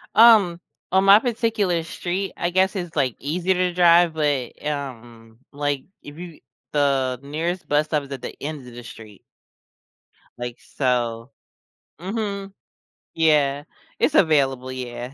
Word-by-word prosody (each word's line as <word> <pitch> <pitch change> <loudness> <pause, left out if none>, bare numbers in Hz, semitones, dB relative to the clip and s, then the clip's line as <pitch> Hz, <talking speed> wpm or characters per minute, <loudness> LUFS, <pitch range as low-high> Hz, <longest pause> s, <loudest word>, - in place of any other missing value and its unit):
Um, 215 -7 +6 0.3
on 190 +1 +3
my 200 +2 +8
particular 225 -7 0
street, 180 +4 -4
I 175 - 0
guess 190 +2 +2
it's, 175 -4 -5
like, 130 -6 +1
easier 175 +6 0
to 180 0 0
drive, 175 -1 +5
but, 145 -5 -2
um, 120 -6 -6
like 145 -2 -2 0.2
if 145 +1 -12
you 175 -2 -10 0.3
the 135 -3 +1
nearest 165 +6 -3
bus 150 +1 +3
stop 150 -1 0
is 140 -1 -13
at 135 -2 -6
the - - -6
end 145 -3 -6
of 125 - -12
the 120 - -9
street. 110 -4 -12 1.2
Like, 120 0 -6
so 120 -2 -2 0.7
mhm. 200 +1 -4 0.6
Yeah. 145 -3 +2 0.4
It's 305 - +2
available, 135 - +2
yeah. 125 0 -6
150 Hz, 140 wpm, -22 LUFS, 130-180 Hz, 1.2 s, my